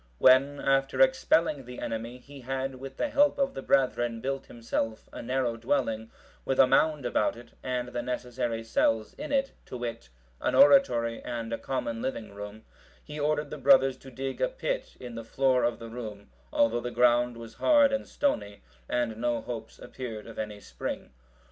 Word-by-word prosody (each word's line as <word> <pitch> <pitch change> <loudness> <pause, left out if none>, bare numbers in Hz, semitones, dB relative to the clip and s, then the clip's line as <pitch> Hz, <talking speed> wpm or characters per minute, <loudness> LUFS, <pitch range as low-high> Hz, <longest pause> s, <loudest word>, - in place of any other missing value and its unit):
When, 135 +2 +5
after 135 0 +1
expelling 170 - +3
the 125 0 -9
enemy, 115 +2 -4
he 140 +2 -13
had, 135 +1 -3
with 135 0 -8
the 295 - 0
help 290 +1 +4
of 275 -1 +1
the - - -5
brethren, 120 -4 +1
built 135 +2 -3
himself 115 -1 -3
a - - -6
narrow 125 -1 -1
dwelling, 115 -2 -1 0.3
with 135 - -1
a - - +9
mound 145 +2 +2
about 120 - +1
it, 120 0 -13
and 125 -1 -2
the 120 - -3
necessary 125 -2 -3
cells 115 -1 +1
in 295 0 -7
it, 275 -1 +1 0.2
to 125 - -6
wit, 115 - -5 0.3
an - - +1
oratory 270 - +5
and 115 -1 -4
a - - -2
common 115 -4 -3
living 115 -6 -4
room, 105 +2 -8 0.4
he 150 0 -8
ordered 150 0 0
the 150 - -6
brothers 135 -1 +5
to 135 - -13
dig 135 +1 -5
a - - +4
pit - - -4
in 125 -2 -8
the 115 0 -6
floor 130 +1 +2
of 120 0 +1
the 115 - -9
room, 105 - -8 0.2
although 115 +1 +2
the 120 - -3
ground 120 0 +3
was 115 -1 -9
hard 285 - +4
and 275 - -1
stony, 105 - -1 0.3
and 120 -3 0
no 120 0 0
hopes 115 -1 -7
appeared 115 -5 -7
of 115 - -9
any 105 -1 -4
spring. - - -6
125 Hz, 185 wpm, -28 LUFS, 115-135 Hz, 0.4 s, a